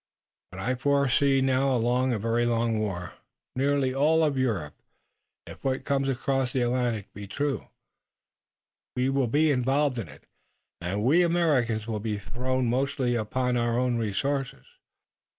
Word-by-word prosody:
But 95 Hz, -, -10 dB
I 125 Hz, +6 st, 0 dB
foresee 140 Hz, +1 st, +2 dB
now 130 Hz, 0 st, +2 dB
a -, -, +2 dB
long, 125 Hz, +3 st, +1 dB
a 120 Hz, -, 0 dB
very 115 Hz, +3 st, 0 dB
long 115 Hz, -1 st, +1 dB
war. 90 Hz, -5 st, -3 dB, 0.4 s
Nearly 135 Hz, 0 st, +1 dB
all 155 Hz, +4 st, +3 dB
of 150 Hz, -3 st, +1 dB
Europe, 105 Hz, -, -1 dB, 0.7 s
if -, -, -12 dB
what 135 Hz, 0 st, -1 dB
comes 135 Hz, -1 st, 0 dB
across 135 Hz, 0 st, -1 dB
the 130 Hz, -, +1 dB
Atlantic 120 Hz, -4 st, -1 dB
be 105 Hz, -1 st, -8 dB
true, 145 Hz, +6 st, -2 dB, 1.3 s
will 130 Hz, +1 st, +1 dB
be 150 Hz, +6 st, +3 dB
involved 135 Hz, 0 st, +1 dB
in 105 Hz, -, -5 dB
it, -, -, -15 dB, 0.6 s
and 95 Hz, +4 st, -2 dB
we 150 Hz, +9 st, +4 dB
Americans 145 Hz, -11 st, +1 dB
will 110 Hz, -2 st, -3 dB
be 105 Hz, 0 st, -2 dB
thrown 125 Hz, +6 st, -2 dB
mostly 130 Hz, +1 st, 0 dB
upon 125 Hz, +2 st, -1 dB
our 120 Hz, -1 st, +1 dB
own 125 Hz, -1 st, +1 dB
resources. 135 Hz, +6 st, -2 dB
125 Hz, 150 wpm, -27 LUFS, 115-135 Hz, 1.3 s, we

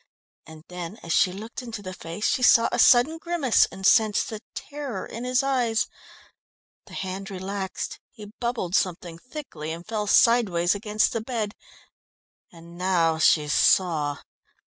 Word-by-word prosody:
And 160 Hz, -1 st, -13 dB
then 180 Hz, +3 st, -7 dB
as 165 Hz, -, -2 dB
she 185 Hz, -, +3 dB
looked 220 Hz, +7 st, -8 dB
into 230 Hz, -4 st, -8 dB
the 185 Hz, -1 st, -6 dB
face 170 Hz, +4 st, -6 dB
she -, -, +1 dB
saw 230 Hz, -2 st, +5 dB
a -, -, -1 dB
sudden 270 Hz, +6 st, +5 dB
grimace, 330 Hz, -8 st, +2 dB
and 190 Hz, -, -7 dB
sensed 215 Hz, -1 st, +3 dB
the 220 Hz, -2 st, -7 dB
terror 285 Hz, -4 st, -6 dB
in 235 Hz, +2 st, -7 dB
his 255 Hz, +2 st, +1 dB
eyes. 245 Hz, -5 st, +1 dB, 1.0 s
The -, -, -11 dB
hand 190 Hz, +1 st, -5 dB
relaxed; 190 Hz, 0 st, -5 dB
he 215 Hz, -6 st, -13 dB
bubbled 235 Hz, -8 st, -3 dB
something 175 Hz, -3 st, -1 dB
thickly 245 Hz, -, -8 dB
and 170 Hz, +2 st, -7 dB
fell 215 Hz, -2 st, -3 dB
sideways 200 Hz, -7 st, +4 dB
against 210 Hz, +1 st, 0 dB
the 230 Hz, -, -2 dB
bed. 220 Hz, -3 st, -3 dB, 1.0 s
And 170 Hz, 0 st, -14 dB
now 170 Hz, -4 st, +1 dB
she 150 Hz, -1 st, +4 dB
saw. 150 Hz, -2 st, +2 dB
205 Hz, 150 wpm, -25 LUFS, 175-235 Hz, 1.0 s, saw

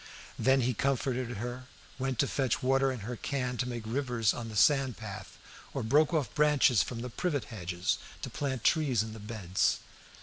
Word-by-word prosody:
Then 135 Hz, 0 st, +4 dB
he 125 Hz, +1 st, +1 dB
comforted 130 Hz, -1 st, -1 dB
her; 125 Hz, +3 st, -5 dB, 0.3 s
went 130 Hz, -1 st, -1 dB
to 140 Hz, -, +3 dB
fetch 130 Hz, 0 st, 0 dB
water 135 Hz, +1 st, +3 dB
in 125 Hz, -4 st, -5 dB
her 120 Hz, +5 st, -4 dB
can 125 Hz, 0 st, -2 dB
to 125 Hz, 0 st, -1 dB
make 120 Hz, -2 st, -4 dB
rivers 120 Hz, -2 st, +1 dB
on 115 Hz, -1 st, -5 dB
the 110 Hz, -, -8 dB
sand 135 Hz, +1 st, +4 dB
path, 100 Hz, -3 st, -8 dB, 0.4 s
or -, -, -1 dB
broke 145 Hz, +8 st, +4 dB
off 155 Hz, -5 st, 0 dB
branches 150 Hz, -6 st, +4 dB
from 115 Hz, -2 st, -4 dB
the 125 Hz, -, -4 dB
privet 150 Hz, -2 st, -1 dB
hedges 90 Hz, -2 st, -1 dB, 0.2 s
to -, -, -3 dB
plant 130 Hz, -5 st, -3 dB
trees 135 Hz, -9 st, +3 dB
in 110 Hz, 0 st, -7 dB
the 110 Hz, -, -9 dB
beds. 100 Hz, -4 st, 0 dB
125 Hz, 190 wpm, -30 LUFS, 110-135 Hz, 0.4 s, Then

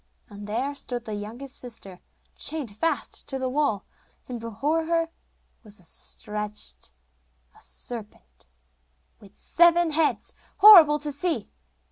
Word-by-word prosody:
And 205 Hz, 0 st, -9 dB
there 250 Hz, +7 st, -2 dB
stood 245 Hz, -3 st, -6 dB
the 215 Hz, -, -5 dB
youngest 230 Hz, +7 st, -6 dB
sister, 200 Hz, -7 st, -8 dB, 0.4 s
chained 280 Hz, -10 st, -1 dB
fast 330 Hz, +10 st, -2 dB
to 270 Hz, -, -3 dB
the 260 Hz, -1 st, -2 dB
wall, 260 Hz, -7 st, 0 dB, 0.4 s
and 245 Hz, -2 st, -5 dB
before 275 Hz, +9 st, -1 dB
her 330 Hz, 0 st, 0 dB, 0.5 s
was 210 Hz, -2 st, -9 dB
stretched 210 Hz, -, -4 dB, 0.6 s
a -, -, -19 dB
serpent 210 Hz, -, -9 dB, 0.7 s
with 200 Hz, 0 st, -18 dB
seven 345 Hz, -1 st, +4 dB
heads, 310 Hz, 0 st, 0 dB, 0.2 s
horrible 365 Hz, -8 st, +9 dB
to 295 Hz, 0 st, -4 dB
see. 285 Hz, -, -2 dB
255 Hz, 120 wpm, -25 LUFS, 210-315 Hz, 0.7 s, horrible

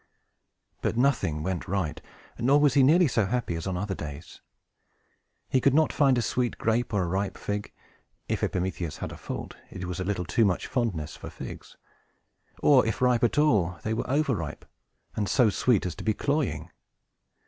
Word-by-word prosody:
But -, -, -1 dB
nothing 120 Hz, -, +1 dB
went 95 Hz, -1 st, -3 dB
right; 90 Hz, -5 st, -2 dB, 0.4 s
nor 135 Hz, +5 st, +4 dB
was 145 Hz, -3 st, +4 dB
he 140 Hz, -, +5 dB
nearly 165 Hz, +6 st, +5 dB
so 110 Hz, -6 st, +1 dB
happy 120 Hz, -4 st, -1 dB
as 85 Hz, +1 st, -4 dB
on 95 Hz, -2 st, -2 dB
other 100 Hz, +1 st, -2 dB
days. 75 Hz, -1 st, -8 dB, 1.1 s
He 130 Hz, -, +1 dB
could 140 Hz, +1 st, +3 dB
not 155 Hz, 0 st, +3 dB
find 135 Hz, -4 st, +4 dB
a 120 Hz, -, +1 dB
sweet 120 Hz, +2 st, -1 dB
grape 115 Hz, +2 st, 0 dB
or 100 Hz, -3 st, +1 dB
a -, -, -2 dB
ripe 95 Hz, +3 st, -2 dB
fig 105 Hz, 0 st, -4 dB, 0.6 s
(if -, -, -1 dB
Epimetheus 90 Hz, -3 st, -2 dB
had -, -, -5 dB
a -, -, -7 dB
fault, -, -, -6 dB
it 90 Hz, -1 st, -6 dB
was 90 Hz, 0 st, -4 dB
a -, -, -1 dB
little 95 Hz, -2 st, -2 dB
too 95 Hz, +9 st, +2 dB
much 95 Hz, -4 st, +1 dB
fondness 95 Hz, -, -2 dB
for -, -, -9 dB
figs); -, -, -9 dB, 0.9 s
or, 135 Hz, -4 st, +6 dB
if 110 Hz, -, -2 dB
ripe 125 Hz, -1 st, +3 dB
at 120 Hz, -, +2 dB
all, 105 Hz, -, +3 dB
they 110 Hz, -, -1 dB
were 115 Hz, -, -3 dB
over 140 Hz, 0 st, +2 dB
ripe, 80 Hz, -7 st, -5 dB, 0.5 s
and 105 Hz, -2 st, -1 dB
so 120 Hz, -5 st, +4 dB
sweet 115 Hz, -2 st, +2 dB
as 90 Hz, -, -2 dB
to -, -, -9 dB
be 110 Hz, -1 st, +1 dB
cloying. 145 Hz, -1 st, -1 dB
110 Hz, 190 wpm, -27 LUFS, 90-130 Hz, 1.1 s, or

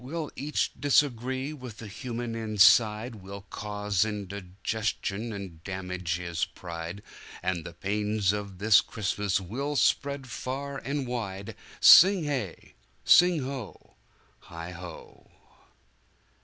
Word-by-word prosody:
"We'll 155 Hz, +3 st, -4 dB
each 150 Hz, +2 st, -1 dB
disagree 130 Hz, 0 st, +1 dB
with 125 Hz, -7 st, -9 dB
the 115 Hz, -, -9 dB
human 120 Hz, +2 st, -5 dB
inside, 110 Hz, +1 st, +4 dB
We'll 100 Hz, +1 st, -9 dB
cause 105 Hz, -1 st, -1 dB
indigestion 105 Hz, +2 st, -3 dB
and 95 Hz, -6 st, -8 dB
damage 90 Hz, -2 st, -3 dB
his 85 Hz, -1 st, -3 dB
pride, 85 Hz, +2 st, -6 dB, 0.4 s
And 90 Hz, -2 st, -1 dB
the 85 Hz, -, -8 dB
pains 105 Hz, +1 st, 0 dB
of 100 Hz, -2 st, -5 dB
this 105 Hz, +2 st, +6 dB
Christmas 105 Hz, -2 st, -1 dB
we'll 130 Hz, +11 st, -4 dB
spread 140 Hz, 0 st, +1 dB
far 135 Hz, +3 st, -4 dB
and 140 Hz, 0 st, -3 dB
wide!" 100 Hz, -6 st, -5 dB, 0.2 s
Sing 190 Hz, 0 st, +8 dB
hey! 130 Hz, -, -4 dB, 0.3 s
sing 175 Hz, -4 st, +6 dB
ho! 130 Hz, -5 st, -7 dB, 0.5 s
heigho! 85 Hz, 0 st, -10 dB
105 Hz, 110 wpm, -28 LUFS, 95-130 Hz, 0.5 s, Sing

